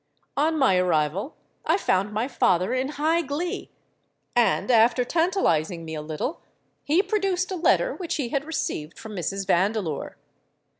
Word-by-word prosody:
On 315 +2 +1
my 260 -10 +4
arrival 180 - 0 0.3
I 325 +4 +2
found 200 - +1
my 220 +4 -1
father 185 -7 +2
in 260 +1 0
high 320 +3 +2
glee; 315 +4 -4 0.7
and, 240 +1 +2
after 240 +2 +4
tantalising 195 - +1
me 160 - -6
a 155 - -4
little, 155 - -4 0.4
he 325 +6 +3
produced 390 -4 0
a - - -1
letter 370 +8 +2
which 345 -3 -4
he 265 -6 -2
had 280 +2 -1
received 275 - -4
from 220 -2 -8
Mrs. 195 +2 -3
Vandeleur. 190 -3 0
245 Hz, 150 wpm, -25 LUFS, -, 0.7 s, my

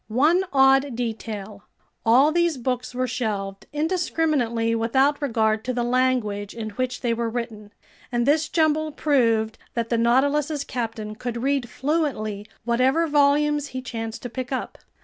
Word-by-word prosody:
One 295 - +3
odd 270 -1 +4
detail: 220 -3 -5 0.4
all 260 +7 +5
these 340 -2 +1
books 250 0 -3
were 255 0 0
shelved 210 -6 -3
indiscriminately 295 -8 0
without 265 +6 +2
regard 220 -5 +1
to 255 - -1
the 240 -1 -1
language 240 -5 0
in 220 -2 -5
which 250 +3 -3
they 240 -2 +1
were 230 0 -1
written, 225 -3 -5 0.4
and 240 -1 +1
this 295 +2 +2
jumble 310 -1 +1
proved 230 -8 +1 0.2
that 230 -1 -1
the 235 - +1
Nautilus's 280 +5 +2
captain 225 -5 -4
could 235 +1 -5
read 275 -3 0
fluently 255 -9 -2 0.2
whatever 255 +7 +2
volumes 295 0 +2
he 260 -2 -6
chanced 225 -3 -5
to 245 - -4
pick 255 +1 -5
up. 260 - -4
250 Hz, 150 wpm, -24 LUFS, 225-285 Hz, 0.4 s, all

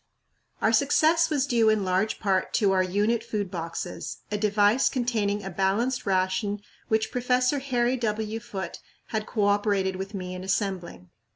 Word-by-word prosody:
Our 220 - +3
success 315 +7 +4
was 285 -4 +1
due 230 -2 +3
in 215 -3 +2
large 190 +4 0
part 195 -3 0
to 200 -3 +3
our 190 -1 +3
"unit 205 +5 +1
food 210 -5 -3
boxes," 170 0 -5
a 210 - 0
device 210 +3 +3
containing 215 -5 -1
a 190 - -5
balanced 200 +8 0
ration 195 +2 0 0.3
which 220 0 0
Professor 250 +2 +1
Harry 255 -2 0
W. 220 -1 -2
Foote 190 -5 -6 0.3
had 215 -2 -2
cooperated 205 -3 +1
with 195 +2 -6
me 185 -1 -5
in 185 0 -6
assembling. 185 - -3
210 Hz, 155 wpm, -26 LUFS, 190-235 Hz, 0.3 s, success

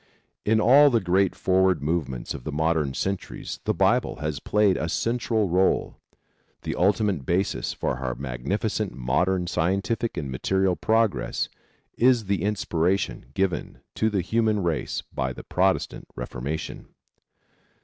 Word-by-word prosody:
In 110 +1 +3
all 140 +6 +7
the 120 -4 +3
great 95 0 +2
forward 95 -3 +2
movements 75 -6 -2
of - - -8
the 75 - -4
modern 75 -2 0
centuries 95 -1 -4
the - - +2
Bible - - +2
has 75 0 -3
played 105 +5 +2
a 80 - -2
central 115 0 0
role. 95 +2 +1 0.7
The - - -2
ultimate 100 -3 +1
basis 90 +8 -1
of - - -23
our 65 -1 -1
magnificent 70 - -2
modern 90 +9 +1
scientific 100 +8 -1
and 70 -3 -3
material 95 +7 +1
progress 110 0 +1 0.5
is 120 -2 +4
the 100 -3 0
inspiration 95 -7 0
given 95 -2 -1
to 110 - +1
the 100 -3 0
human 110 +1 +1
race 80 -5 -2
by 65 -1 -2
the - - -9
Protestant 95 +1 0
Reformation. 75 +6 -5
95 Hz, 135 wpm, -25 LUFS, 80-105 Hz, 0.7 s, all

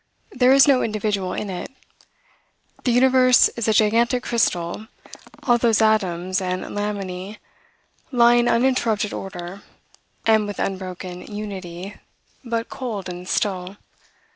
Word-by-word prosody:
There 250 0 +3
is 275 +1 +7
no 270 -3 +4
individual 205 -4 -2
in 210 - -4
it. 180 -1 -6 1.2
The 250 - +3
universe 255 0 +5
is 235 -2 -4
a - - +4
gigantic 230 +4 +2
crystal, 210 -3 -1 0.6
all 240 -3 +3
those 230 -2 +3
atoms 185 -4 +1
and 185 0 -2
laminae 200 -1 -5 0.7
lie 240 -2 +5
in 240 0 +3
uninterrupted 230 -4 +1
order, 180 0 -7 0.6
and 220 -2 +3
with 205 - -6
unbroken 185 -1 -5
unity, 195 -2 -7 0.5
but 230 -2 -3
cold 210 -8 -5
and 180 +1 -8
still. 190 -2 -2
210 Hz, 120 wpm, -22 LUFS, 185-235 Hz, 1.2 s, is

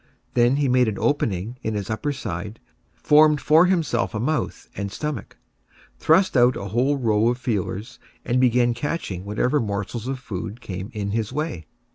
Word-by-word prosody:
Then 120 +2 +4
he 145 -1 +1
made 125 -1 +3
an 105 - -2
opening 115 -5 -1
in 110 -3 -2
his 100 -2 -3
upper 130 +7 -1
side, 105 -4 -5 0.4
formed 150 0 +5
for 160 +5 +5
himself 160 -12 0
a - - -1
mouth 155 +7 -2
and 100 0 -4
stomach, 150 0 -5 0.6
thrust 185 +3 +3
out 125 0 +4
a 100 - -5
whole 130 +7 +1
row 110 -3 +2
of 120 0 +1
feelers, 110 -3 -3 0.3
and 125 +1 +1
began 120 -1 +3
catching 120 - -4
whatever 125 +8 +1
morsels 105 +1 -3
of 135 0 -2
food 110 -2 -6
came 95 -3 -6
in 100 -1 -2
his 110 0 -2
way. 150 - -4
120 Hz, 170 wpm, -23 LUFS, 105-140 Hz, 0.6 s, formed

